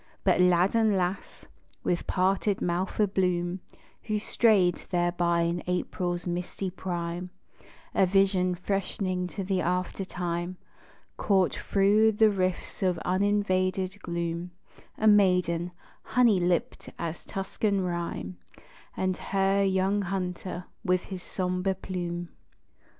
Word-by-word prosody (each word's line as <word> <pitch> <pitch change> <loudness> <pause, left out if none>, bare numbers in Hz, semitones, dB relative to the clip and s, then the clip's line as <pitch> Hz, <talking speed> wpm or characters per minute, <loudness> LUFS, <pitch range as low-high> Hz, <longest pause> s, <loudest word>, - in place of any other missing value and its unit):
But - - +3
lad 180 +1 +4
and 220 -3 +3
lass, 185 +1 -3 0.4
with 175 - -1
parted 195 +2 +1
mouth 180 +4 -2
a 210 - +6
bloom, 180 -2 0 0.5
Who 215 -1 0
strayed 205 -5 +3
thereby 175 -1 +1
in 170 +1 0
April's 180 0 -2
misty 180 +2 -3
prime, 175 -1 -4 0.6
A 190 - +4
vision 190 -1 +3
freshening 185 0 -2
to 195 +2 -5
the 190 -1 0
after 180 +2 -1
time 175 -1 -3 0.6
Caught 190 -3 +2
thro' 205 +3 +3
the 220 0 +4
rifts 185 -2 -2
of 185 -2 +2
uninvaded 190 0 +1
gloom, 170 0 -3 0.5
A 220 - -1
maiden, 180 -5 +4 0.3
honey 235 -6 +3
lipped 175 -1 -1
as 170 -1 -4
Tuscan 195 +1 -1
rhyme, 170 - -3 0.6
And 185 -1 0
her 195 0 +1
young 195 +1 +2
hunter, 180 -1 -4 0.2
with 180 -3 +2
his 190 -2 -7
sombre 185 +1 -1
plume. 175 -2 -4
185 Hz, 115 wpm, -28 LUFS, 175-195 Hz, 0.6 s, a